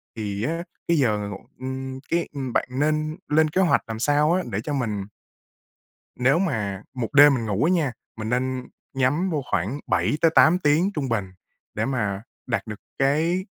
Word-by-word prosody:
thì 105 -2 -3
á, 165 +6 -1 0.2
cái 170 - +3
giờ 120 -7 +2
ngủ, 100 - -5 0.2
ừm, 130 0 -5
cái, 170 0 +1
ừm, 135 -4 -4
bạn - - +1
nên 155 +3 0
lên 155 +1 +3
kế 185 +5 +1
hoạch 175 - +3
làm 110 0 -5
sao 150 +4 +3
á, 185 +1 +1
để 100 - -1
cho 145 - -3
mình 110 -7 -2 1.1
Nếu 130 +6 +4
mà 105 - -2
1 125 -1 -4
đêm 145 0 +8
mình 120 -4 -1
ngủ 105 +3 0
á 165 - +3
nha, 160 -7 +1 0.3
mình 110 0 -4
nên 130 +1 -1 0.3
nhắm 135 +8 +1
vô 155 -4 -1
khoảng 105 +11 0
7-8 160 +2 +4
tiếng 160 +4 +3
trung 140 -6 -2
bình 100 -5 -1 0.4
để 110 - -1
mà 105 -7 -1 0.3
đạt 115 -3 -1
được 105 -1 -6 0.2
cái 160 +7 +2
135 Hz, 180 wpm, -24 LUFS, 115-155 Hz, 1.1 s, đêm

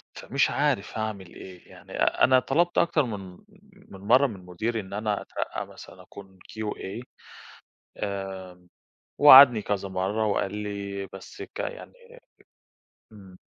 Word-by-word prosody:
فمش 140 +2 0
عارف 140 -10 -1
أعمل 105 -5 -5
إيه 90 -2 -13
يعني، - - -16
أ - - 0
أنا 130 0 +6
طلبت 175 +6 0
أكتر 155 -3 +3
من 95 -6 -7 0.4
من 190 - -15
مرة 125 +8 +4
من 95 -6 -10
مديري، 110 +6 -3
إن 95 -2 -9
أنا 105 0 -2
أترقى - - -5
مثلًا - - -14
أكون 95 -2 -14
QA، 110 +1 -6 0.9
آآ، 95 -3 -6 0.5
ووعدني 135 -5 +9
كذا 100 -1 -3
مرة، 95 +4 -1
وقال 100 0 -1
لي، 100 -1 -5
بس - - -11
ك - - -11
يعني، - - -6 1.2
إمم. 95 -3 -15
105 Hz, 135 wpm, -26 LUFS, 95-120 Hz, 1.2 s, ووعدني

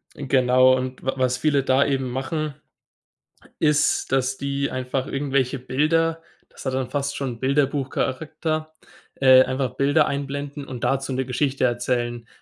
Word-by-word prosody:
Genau 130 -1 +4
und 130 0 -4
w 135 - 0
was 125 -1 +1
viele 145 0 +1
da 135 +1 +3
eben 135 -2 -1
machen, 140 +3 -3 1.0
ist, 150 -3 +2
dass 135 0 +1
die 140 0 -2
einfach 130 +1 -2
irgendwelche 135 -2 -1
Bilder 160 +6 +1 0.3
das - - -13
hat 130 - -1
dann 130 -1 -2
fast 140 +1 -2
schon 125 -4 -4
Bilderbuchcharakter 145 +3 -1 0.4
äh, 130 -1 +7
einfach 130 -1 -2
Bilder 145 +2 +3
einblenden 140 +1 -4
und 125 -3 -7
dazu 135 0 0
'ne 130 +1 -1
Geschichte 130 +2 0
erzählen 120 -1 -1
135 Hz, 140 wpm, -23 LUFS, 130-145 Hz, 1.0 s, äh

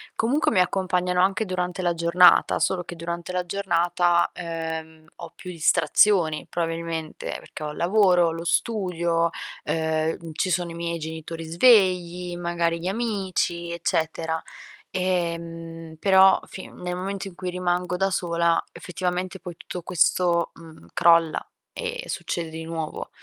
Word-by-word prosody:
comunque 265 +8 +1
mi 190 - +3
accompagnano 180 -1 +1
anche 195 +3 +2
durante 180 -1 -2
la 175 -1 +2
giornata. 170 +2 +5
Solo 180 -2 +1
che 175 - -7
durante 170 +1 -5
la 180 -1 -1
giornata, 175 -2 +1
ehm, 160 -2 -5
ho 170 -1 -9
più 180 - -8
distrazioni 165 0 +3
probabilmente, 165 -1 -3
perché - - -10
ho 150 - -3
il - - -10
lavoro, 180 -2 +4
lo 165 +1 -6
studio, 170 -4 +1 0.4
ehm, 160 0 -1
ci 185 +4 -1
sono 175 -1 0
i - - -7
miei 170 0 -3
genitori 160 +1 -6
svegli, 180 -2 +3
magari 170 -1 -1
gli 175 - -4
amici, 190 -5 -1
eccetera. 160 -1 -1 0.5
Ehm, 165 -3 -3
però 190 -1 +6
fin 190 - -10
nel 180 0 -4
momento 195 +2 -4
in 185 - -11
cui 185 0 -4
rimango 180 0 -1
da 195 +1 +1
sola 170 -2 +1
effettivamente 180 +1 -3
poi 180 -2 -8
tutto 180 - -7
questo, 175 0 +2
mhmm, 160 - -14
crolla 165 -2 +4 0.3
e - - -4
succede 170 -2 -3
di 160 0 -6
nuovo. 165 -1 -5
175 Hz, 140 wpm, -24 LUFS, 165-185 Hz, 0.5 s, però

